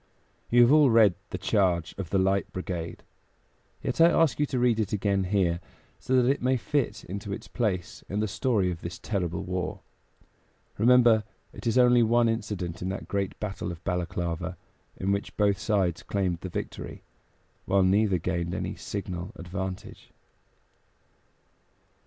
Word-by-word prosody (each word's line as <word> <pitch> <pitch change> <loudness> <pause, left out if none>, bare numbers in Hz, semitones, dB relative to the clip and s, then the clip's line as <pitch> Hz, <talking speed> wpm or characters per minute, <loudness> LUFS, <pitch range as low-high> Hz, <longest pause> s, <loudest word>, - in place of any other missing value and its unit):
You 120 +1 +5
have 120 - +5
all 150 -2 +6
read 110 -5 +6 0.2
"The - - -4
Charge 90 -5 +1
of 95 -4 -5
the 100 - +1
Light 95 +1 +1
Brigade"; 90 -3 -5 0.8
yet - - -1
I 165 - +8
ask 165 -4 +2
you 150 - +2
to 135 - -2
read 120 -2 +2
it 110 - -1
again 100 -2 +1
here, 90 -3 +1 0.4
so 130 0 +2
that 125 - +3
it 140 +2 +1
may 130 +1 +2
fit 125 +4 -1
into 100 +2 -6
its 100 - -6
place 100 -7 -2
in 100 - -2
the 110 - +1
story 100 -3 +1
of 85 - -7
this 85 +1 -6
terrible 95 -3 -2
war. 90 0 -3 1.0
Remember, 120 -1 +5 0.3
it - - -7
is 115 - +2
only 125 -1 +6
one 120 +1 +4
incident 105 -6 -3
of 90 - -2
that 95 - -5
great 100 -1 -2
battle 95 -4 -4
of 85 - -10
Balaklava, 90 -1 -3 0.4
in 95 +1 -1
which 100 0 -3
both 100 -2 +2
sides 95 -5 0
claimed 95 -4 -1
the 95 - -6
victory, - - -6 0.6
while 95 0 +3
neither 95 +1 +3
gained 85 0 -2
any - - -3
signal 95 -2 -5
advantage. 95 +2 -6
100 Hz, 160 wpm, -27 LUFS, 90-115 Hz, 1.0 s, I